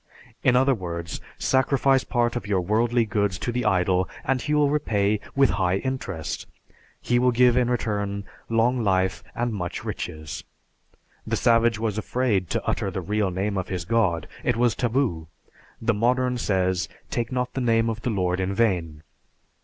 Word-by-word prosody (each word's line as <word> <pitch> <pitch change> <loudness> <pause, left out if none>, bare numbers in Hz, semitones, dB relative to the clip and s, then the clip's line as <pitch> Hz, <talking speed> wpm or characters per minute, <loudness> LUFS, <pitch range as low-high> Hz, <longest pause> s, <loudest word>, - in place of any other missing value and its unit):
In 130 -2 +4
other 135 +2 +4
words, 85 -6 -5 0.2
sacrifice 135 0 +2
part 120 -1 0
of 120 -4 -4
your 100 -3 +1
worldly 115 +5 +2
goods 100 -3 0
to 120 - -3
the 125 0 -2
idol, 95 0 +2 0.2
and 130 -1 +1
he 150 +3 0
will 145 -1 +3
repay 105 -8 +1 0.2
with 135 -1 +4
high 90 +1 +2
interest. 100 - -4 0.5
He 120 0 +1
will 125 +1 +4
give 125 0 +4
in 125 -1 +2
return 100 -4 -1 0.3
long 115 +2 +2
life 95 -2 +1
and 120 -1 -1
much 90 -4 -4
riches. 75 -1 -5 0.8
The - - 0
savage 115 -1 +3
was 110 -1 -1
afraid 110 -6 0
to - - -2
utter - - -1
the - - -4
real 105 -1 0
name 95 +2 -1
of 90 - -4
his 90 -3 -4
god, 100 -8 +1 0.2
it - - +1
was 120 -1 +3
taboo. 115 - 0 0.5
The 115 +1 +1
modern 125 +3 +1
says, 95 -2 0 0.2
"Take 120 +1 -2
not 125 -1 -2
the 135 - -2
name 115 -1 +2
of 115 0 -3
the 125 - -1
Lord 90 -4 0
in 95 +1 -1
vain." 85 -9 0
110 Hz, 170 wpm, -25 LUFS, 95-125 Hz, 0.8 s, In